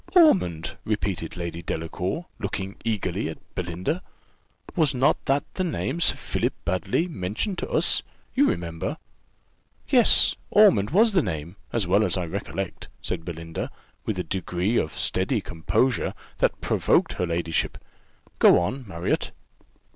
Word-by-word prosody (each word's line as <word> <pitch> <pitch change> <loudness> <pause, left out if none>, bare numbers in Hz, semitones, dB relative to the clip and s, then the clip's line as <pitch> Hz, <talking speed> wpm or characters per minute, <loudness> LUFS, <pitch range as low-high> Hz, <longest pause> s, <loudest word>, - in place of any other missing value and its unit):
"Ormond!" 185 - +4
repeated 100 -6 -2
Lady 85 -1 -4
Delacour, 90 - -3
looking 100 -2 -4
eagerly 100 -5 -1
at 80 - -7 0.2
Belinda: 90 - -2 0.7
"was 155 -7 +3
not 130 +2 +2
that 140 +1 +2
the 185 - -1
name 165 -2 -2
Sir - - +5
Philip - - -2
Baddely 95 - 0
mentioned 110 - -3
to - - -4
us - - +3 0.3
you 280 +2 +4
remember?" 85 -1 -3 0.9
"Yes, - - +6
Ormond 100 +1 +5
was 215 - +4
the 180 - +4
name, 85 - -4 0.2
as 115 -4 +1
well 100 +4 +3
as 105 - +1
I 90 - -1
recollect," 95 +1 -5
said - - -4
Belinda, 85 -1 -5 0.3
with 110 - -2
a 90 - -1
degree 95 +4 -1
of 80 - +1
steady 95 - 0
composure 95 +8 0 0.2
that - - +1
provoked - - +2
her 90 - -2
ladyship. 85 -1 -1 0.6
"Go - - +7
on, 120 +8 -2
Marriott." 85 -2 -1
95 Hz, 140 wpm, -25 LUFS, 85-130 Hz, 0.9 s, Go